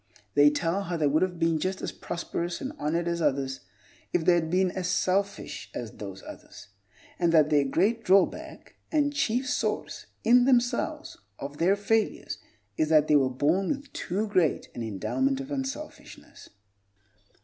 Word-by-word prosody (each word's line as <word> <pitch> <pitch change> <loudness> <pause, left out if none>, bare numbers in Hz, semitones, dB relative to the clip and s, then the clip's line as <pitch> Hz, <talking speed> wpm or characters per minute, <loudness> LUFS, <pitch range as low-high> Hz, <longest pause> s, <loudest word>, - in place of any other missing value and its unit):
They 145 0 +6
tell 170 +6 -1
how 175 -2 -2
they 155 - +1
would 150 +3 +2
have 185 -1 0
been 165 -1 +1
just 185 +3 -2
as - - -4
prosperous 170 0 -4
and 270 +2 -5
honored 170 +3 -1
as 170 0 -1
others 135 -3 0 0.5
if 170 -2 0
they 180 - +6
had 165 -2 +1
been 185 +1 +2
as 185 -1 -3
selfish 195 +2 -1
as 115 -3 -5
those 95 -2 -8
others; - - -12 0.5
and 170 -2 +3
that 155 -2 +5
their 145 -2 +4
great 205 - +1
drawback, 195 0 +1
and 290 -2 +2
the - - -14
chief 250 -1 0
source, 290 - -2 0.2
in 245 +2 +5
themselves, 265 +5 0 0.2
of 140 +1 -7
their 180 +4 +4
failures, 215 +1 -1 0.4
is 155 - +1
that 155 -1 +5
they 150 - +4
were 135 -3 +4
born 155 +9 +1
with 285 0 -4
too 205 +5 -2
great 185 -7 +1
an - - -6
endowment 190 - -1
of 275 +1 -7
unselfishness. 275 +2 -7
180 Hz, 170 wpm, -27 LUFS, 150-225 Hz, 0.5 s, They